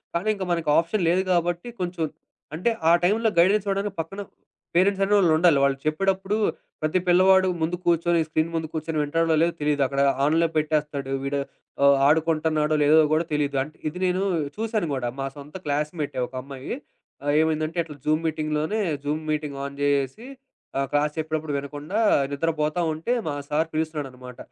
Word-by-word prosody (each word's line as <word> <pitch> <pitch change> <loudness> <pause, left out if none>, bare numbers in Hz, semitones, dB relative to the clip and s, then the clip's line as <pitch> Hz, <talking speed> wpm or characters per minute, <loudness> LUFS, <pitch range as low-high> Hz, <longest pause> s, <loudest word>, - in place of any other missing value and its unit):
కానీ 180 +6 0
ఇంకా 190 -2 -4
మనకు 165 -3 0
ఆప్షన్ 170 +4 +1
లేదు 185 +2 +2
గాబట్టి, 175 +4 0
కొంచెం 175 -2 -2 0.5
అంటే 185 +8 +1 0.2
ఆ - - +6
టైంలో 220 +5 +3
గైడెన్స్ 195 +4 +4
అవ్వడానికి 200 +1 -1
పక్కన 195 +5 -7 0.5
పేరెంట్స్ 195 +2 +3
అనే 200 +1 +1
వాళ్ళు 175 -5 +4
ఉండాలి. 165 -4 +5
వాళ్ళు 140 -1 +2
చెప్పేటప్పుడు, 195 +5 0 0.5
ప్రతి 155 +4 +1
పిల్లవాడు 190 +1 +5
ముందు 165 +2 0
కూర్చొని 170 0 +2
స్క్రీన్ 155 +1 0
ముందు 160 -1 -2
కూర్చొని 160 0 -2
వింటాడో, 165 +2 +1
లేదో 170 - +1
తెలీదు. 145 -1 +1
అక్కడ 140 +1 -1 0.2
ఆన్‌లో 165 +3 +3
పెట్టేస్తాడు. 150 -3 -1
వీడు 140 +1 -1 0.4
ఆహ్, 140 0 +6
ఆడుకుంటున్నాడో, 155 -1 +2
లేదో 155 +2 +6 0.2
కూడా 165 +2 +1
తెలీదు. 145 -1 0
అంటే 150 +2 -12
ఇది 165 - -10
నేను 185 +2 0 0.3
చూసానుడా 170 - -1
మా 135 - -1
సొంత 145 +4 -11
క్లాస్ 150 +1 0
మేట్టే 140 -3 -3
ఒక - - -24
అమ్మాయి. 135 - -7 0.5
ఆహ్, 145 0 +1
ఏమైందంటే 160 +1 -1
ఎట్లా 150 -2 -11
జూమ్ 155 +1 +2
మీటింగ్‌లోనే 155 +5 -1 0.3
జూమ్ 155 +2 -2
మీటింగ్ 150 -2 -3
ఆన్ 140 0 -6
జేసేసి 145 - 0 0.5
ఆహ్, 135 - 0
క్లాస్ 150 +1 +1
చెప్పేడప్పుడు 155 -1 -2
వినకుండా, 145 +8 -4 0.3
నిద్రపోతా 155 +2 -1
ఉంటే 165 +10 -2
మా 150 - -1
సారు 155 +2 0
పిలుస్తున్నాడనమాట. 135 -6 -4
155 Hz, 160 wpm, -24 LUFS, 145-175 Hz, 0.5 s, ఆ